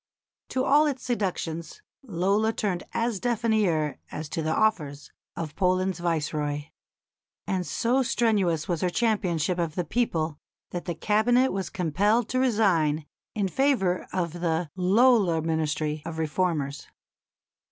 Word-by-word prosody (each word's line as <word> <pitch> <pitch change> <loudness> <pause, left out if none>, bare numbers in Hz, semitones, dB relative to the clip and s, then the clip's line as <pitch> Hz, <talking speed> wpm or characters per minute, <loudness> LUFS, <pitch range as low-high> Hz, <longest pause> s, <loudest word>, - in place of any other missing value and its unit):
To 260 - 0
all 295 +2 +5
its 270 -3 -3
seductions 185 - -3 0.2
Lola 205 -1 +1
turned 190 -6 -1
as 230 -3 -1
deaf 240 0 -1
an 230 -1 +3
ear 165 -9 +1
as 155 0 -5
to 165 - -2
the 155 0 -1
offers 155 -9 0 0.2
of 160 -3 -5
Poland's 185 -1 +1
Viceroy. 150 -3 -2 0.8
And 185 -2 -2
so 250 +3 +1
strenuous 200 -10 +1
was 175 -4 -1
her 180 - +2
championship 180 -5 0
of 165 -3 -1
the 180 - -1
people 165 -7 -1 0.3
that 175 - -4
the 175 - -3
Cabinet 240 +8 +3
was 190 -1 -3
compelled 205 +5 +1
to 255 - 0
resign 180 - +2 0.3
in 205 -3 +1
favour 215 -7 +1
of 170 -3 -2
the 165 -2 -1
"Lola 195 -1 +4
Ministry" 155 -1 -1
of 165 -1 -6
reformers. 155 -3 -1
180 Hz, 140 wpm, -26 LUFS, 160-220 Hz, 0.8 s, all